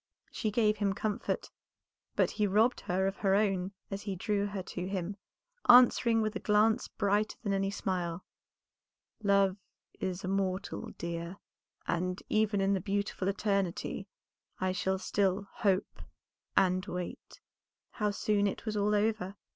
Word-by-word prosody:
She 220 - -1
gave 215 0 +2
him 200 -1 +1
comfort, 210 +3 -2 0.6
but - - +3
he 210 -1 +1
robbed 220 +5 +3
her 185 +2 0
of 195 0 -1
her 195 -1 +2
own 195 -3 +1 0.2
as 195 +1 -3
he 200 -2 -4
drew 205 +2 0
her 200 -2 -4
to 180 0 -5
him, 195 0 -3 0.5
answering 240 -2 +7
with 215 0 -2
a - - -1
glance 215 +1 +3
brighter 205 +1 0
than 200 -3 0
any 195 0 +1
smile 180 -3 -2 1.0
"Love 200 -2 +3 0.4
is 185 0 -3
immortal, 190 0 -2
dear, 170 +2 -4 0.5
and 180 +1 -1
even 215 -2 +2
in 195 +1 +3
the 190 - 0
'beautiful 200 -1 -2
eternity' 195 -1 -1 0.5
I 185 0 +1
shall 190 +1 0
still 195 +1 0
hope 195 -5 0 0.6
and 185 0 +4
wait." 180 -1 -6 0.5
How 210 -3 0
soon 205 0 +1
it 200 - -4
was 215 -1 -2
all 210 0 +2
over! 205 -2 0
200 Hz, 145 wpm, -31 LUFS, 185-210 Hz, 1.0 s, answering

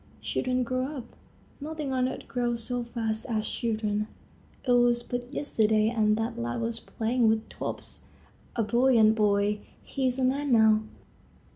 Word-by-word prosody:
Children 255 0 0
grow 255 +1 -1
up; 240 -2 -10 0.4
nothing 300 -2 -4
on 255 0 +1
earth - - -7
grows 240 -2 -1
so 245 +1 -1
fast 225 -2 -2
as 215 -2 -1
children. 215 -2 -1 0.6
It - - +3
was 240 -1 +4
but 245 +1 -5
yesterday 220 -7 +2
and 215 -2 +2
that 225 - -2
lad 120 0 -2
was 230 0 -2
playing 230 +1 +1
with 220 0 0
tops, - - -6 0.5
a 230 - +1
buoyant 235 -1 +4
boy. 210 -1 +2 0.2
He 265 -1 -1
is 250 0 -1
a 265 - 0
man 275 +2 +1
now. 220 -1 +5
235 Hz, 155 wpm, -28 LUFS, 220-255 Hz, 0.6 s, now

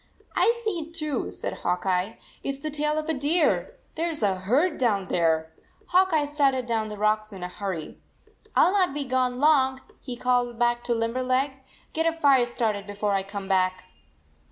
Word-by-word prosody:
" - - -37
I 470 +1 +3
see 425 -6 -1
it, 325 +1 -8
too," 305 -3 -2
said - - -5
Hawk 180 +1 -1
Eye. 185 +3 0 0.3
"It 275 - -2
s - - -12
the 305 +2 -5
tail 300 +1 0
of 310 0 -2
a 320 - +1
deer. 320 - +1 0.2
There 335 +2 -1
s 310 -8 -3
a 200 -2 +3
herd 255 - +1
down 205 -7 +1
there! 160 -2 +1 0.2
" - - -33
Hawk 375 +1 +4
Eye 305 -2 +2
started 275 -3 +1
down 225 -2 -1
the 210 - -7
rocks 215 +1 +1
in 190 -3 -8
a - - -2
hurry. 180 -3 -5 0.6
"I - - +6
ll 365 - +1
not 365 -8 +2
be 290 -1 -2
gone 255 -1 0
long," 265 -3 +4 0.2
he 250 -3 -6
called 250 0 +2
79 240 -1 -11
back 240 0 +1
to 240 - +1
Limberleg. 255 +4 0 0.2
" - - -30
Get 325 +1 +1
a 330 - +2
fire 275 -5 +5
started 215 -4 -2
be 205 - -7
fore 205 0 0
I 195 -1 +2
come 195 0 -7
back." 185 -1 +1
250 Hz, 220 wpm, -26 LUFS, 205-300 Hz, 0.6 s, I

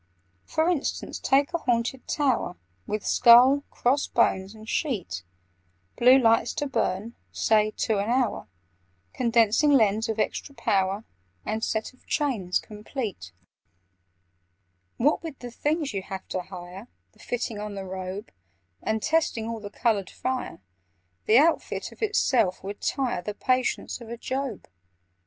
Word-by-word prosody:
"For 315 +1 0
instance, 345 -6 -1
take 280 +4 +2
a 340 - 0
Haunted 245 -1 -1
Tower, 275 - 0 0.3
With 210 0 -3
skull, 250 +4 +7
cross 270 +4 +1
bones, 195 -3 +1
and 220 0 -12
sheet; 205 - -2 0.7
Blue 250 +2 +7
lights 230 -3 +3
to 290 - -1
burn 225 -4 -1 0.2
(say) 215 -1 +3
two 215 -3 +1
an 205 +3 -1
hour, 245 - 0 0.7
Condensing 235 +3 +3
lens 220 -5 +3
of 220 - -1
extra 280 +5 -2
power, 195 0 0 0.4
And 220 +1 -2
set 220 +3 -2
of 255 - -27
chains 215 -12 0
complete: 210 - -6 1.7
"What 290 +6 +2
with 320 -5 -7
the 245 -1 -8
things 295 +2 -1
you 195 - -2
have 190 0 -7
to 185 - -2
hire— 180 +3 -10 0.2
The - - -28
fitting 230 -3 -3
on 210 -1 -5
the 195 -1 -5
robe— 185 +2 -6 0.5
And 220 0 -1
testing 310 -8 +1
all 230 -1 -4
the 205 -1 -7
coloured 205 -3 0
fire— 255 - -4 0.7
The 220 - +6
outfit 320 +4 +2
of - - -17
itself 250 - +2
would 200 +1 -6
tire 250 -8 -1
The 205 +3 -5
patience 255 0 0
of 230 - -10
a 235 - -5
Job! 260 - -4
230 Hz, 145 wpm, -26 LUFS, 205-265 Hz, 1.7 s, skull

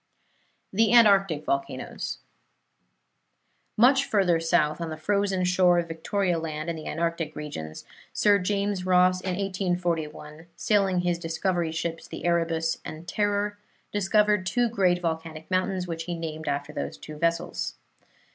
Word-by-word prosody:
THE 220 +2 +3
ANTARCTIC 195 -9 +5
VOLCANOES 135 -1 -3 1.6
Much 265 +5 +5
further 190 -9 +2
south, 165 -1 +1
on 165 - -3
the 155 - -5
frozen 195 +2 0
shore 180 -1 +4
of 170 -1 0
Victoria 170 +2 -1
Land 155 0 -4
in - - -5
the 155 - -8
Antarctic 165 -1 -2
regions, 80 - -7 0.3
Sir 205 -1 +4
James 200 0 -1
Ross, 185 0 +4
in 185 -1 -2
1841, 175 -5 -3
sailing 195 -2 +2
in 180 - +2
his 175 -1 0
discovery 170 0 -1
ships 165 0 -4
the - - -7
Erebus 165 -1 +1
and 160 +2 -8
Terror, 205 0 0 0.3
discovered 210 -1 +2
two 245 +3 +1
great 185 -5 +2
volcanic 160 0 -4
mountains, 185 0 0
which 165 -2 -5
he 175 - -3
named 160 -1 -6
after 145 +1 -2
those - - -4
two 155 0 -10
vessels. 170 +2 -1
175 Hz, 140 wpm, -26 LUFS, 160-195 Hz, 1.6 s, ANTARCTIC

